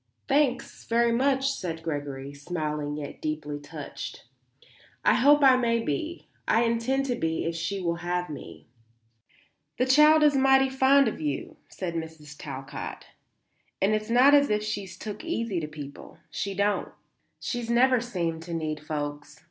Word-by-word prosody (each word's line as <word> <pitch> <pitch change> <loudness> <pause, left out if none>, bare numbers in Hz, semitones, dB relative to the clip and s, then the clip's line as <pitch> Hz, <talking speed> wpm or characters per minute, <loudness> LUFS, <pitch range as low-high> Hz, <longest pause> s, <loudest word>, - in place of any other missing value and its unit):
"Thanks, 275 -3 0
very 235 0 +2
much," 270 +3 +2
said 165 -10 -5
Gregory, 145 -3 -4
smiling 150 -1 -3
yet 145 -2 -7
deeply 150 -1 -3
touched. 145 - -8 0.8
"I - - +6
hope 290 +3 +5
I 265 -1 +8
may 235 -2 +1
be. 230 - -3 0.2
I 225 +2 +4
intend 235 +4 +1
to 250 -2 -1
be 160 -7 -1
if 165 0 -2
she 165 +4 -2
will 170 -2 -1
have 175 +1 -2
me." 150 - -9 1.1
"The 255 - +2
child 300 +4 +6
is 295 -1 +5
mighty 270 0 +5
fond 265 +1 +4
of 215 - -3
you," 145 -3 -3
said 180 -3 -5
Mrs. 160 -3 -7
Talcott. 135 -1 -7 0.7
"And 195 +3 +2
it's 215 +1 -1
not 255 +4 +6
as 285 0 +5
if 210 0 +1
she 210 -2 -3
took 200 - -8
easy 230 - -2
to 155 - -4
people. 145 -2 -10
She 200 -1 -3
don't. 200 +1 0 0.5
She's 240 -2 -4
never 250 +1 +4
seemed 170 -9 -3
to 170 0 -5
need 155 -2 -3
folks. 150 -1 -5
200 Hz, 155 wpm, -27 LUFS, 155-255 Hz, 1.1 s, I